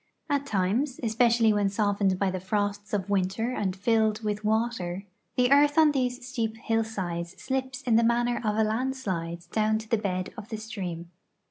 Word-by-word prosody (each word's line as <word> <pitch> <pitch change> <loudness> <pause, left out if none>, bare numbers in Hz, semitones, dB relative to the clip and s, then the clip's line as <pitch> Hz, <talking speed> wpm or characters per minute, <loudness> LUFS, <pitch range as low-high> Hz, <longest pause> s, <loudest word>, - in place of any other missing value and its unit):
At 280 -1 0
times 220 +7 0
(especially' 230 0 +3
yvhen 205 -1 +2
softened 200 -2 +1
by' 195 0 +1
the 185 - -3
frosts 205 +2 -2
of 200 -3 0
yvinter 200 +5 0
and 190 -3 -1
filled 220 +1 +1
yvith 210 -1 -2
yvater) 215 -4 -1 0.3
the 250 +1 +3
earth 290 +1 +5
on 310 -2 +6
these 250 -2 -1
steep 225 -4 -2
hillsides 190 -7 -2
slips 260 -1 -3
in 230 -3 +3
the 230 - +4
manner 240 +1 +2
of 210 -1 0
a 220 - +4
landslide 215 -8 -2
down 215 0 +2
to 220 0 -7
the 225 0 +1
bed 185 -3 -2
of 220 -1 -9
the 220 - -4
stream. 180 -6 -6
220 Hz, 175 wpm, -27 LUFS, 195-240 Hz, 0.3 s, on